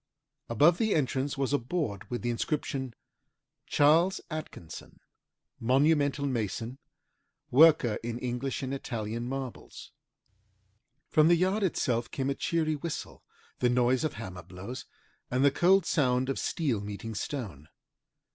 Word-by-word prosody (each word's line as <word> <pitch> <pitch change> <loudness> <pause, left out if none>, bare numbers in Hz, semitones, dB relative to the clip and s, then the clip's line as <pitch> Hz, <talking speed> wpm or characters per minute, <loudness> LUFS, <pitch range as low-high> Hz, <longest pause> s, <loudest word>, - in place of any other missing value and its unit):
Above 150 +9 +4
the 220 -2 +2
entrance 135 -1 0
was 135 0 0
a 145 - +3
board 120 - -3
with 120 -1 -4
the 120 - 0
inscription 130 -1 -2 0.7
CHS. 165 +6 +4
ATKINSON, 150 - -8 0.6
MONUMENTAL 140 +3 +2
MASON 120 0 -3 0.7
WORKER 145 -5 +6
IN 115 0 -4
ENGLISH 125 +2 -3
AND 130 +1 -3
ITALIAN 115 -2 -4
MARBLES 135 -2 -7 1.2
From 155 0 +5
the 170 - +6
yard 185 +5 +1
itself 125 - 0
came 135 0 -2
a - - +1
cheery 160 0 0
whistle, 155 +2 -6 0.4
the 125 - +3
noise 125 +2 +2
of 155 - -1
hammer 95 -5 -7
blows, 95 +8 -8 0.4
and 130 +2 +2
the 140 - +6
cold 180 +5 +4
sound 130 -3 +1
of 135 - -1
steel 135 -11 -1
meeting 105 +2 -6
stone. 100 - -5
130 Hz, 130 wpm, -29 LUFS, 120-150 Hz, 1.2 s, WORKER